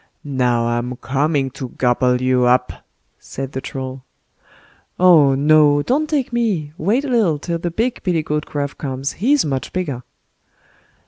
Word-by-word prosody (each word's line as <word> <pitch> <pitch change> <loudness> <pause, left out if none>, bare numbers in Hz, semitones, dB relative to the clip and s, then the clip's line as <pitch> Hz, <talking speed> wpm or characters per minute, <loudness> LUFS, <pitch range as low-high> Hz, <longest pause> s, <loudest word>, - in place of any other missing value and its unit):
"Now, 125 -4 0
I'm 120 +1 -2
coming 140 +1 -1
to 130 -1 -7
gobble 125 0 +1
you 130 -1 +2
up", 125 +1 +2 0.5
said 135 0 -7
the 130 - -5
Troll. 130 -1 -6 1.0
"Oh, 160 -7 +6
no! 145 0 +4
don't 300 - 0
take 275 -6 -1
me, 195 -11 -1
wait 220 - 0
a - - -3
little 220 - +2
till 170 +3 -4
the 175 - -2
big 230 +8 -2
billy 175 -4 0
goat 150 -1 -3
Gruff 145 -1 -4
comes, 135 -1 -4
he's 280 +5 +3
much 135 -3 -3
bigger." 150 -9 -3
145 Hz, 150 wpm, -19 LUFS, 130-180 Hz, 1.0 s, Oh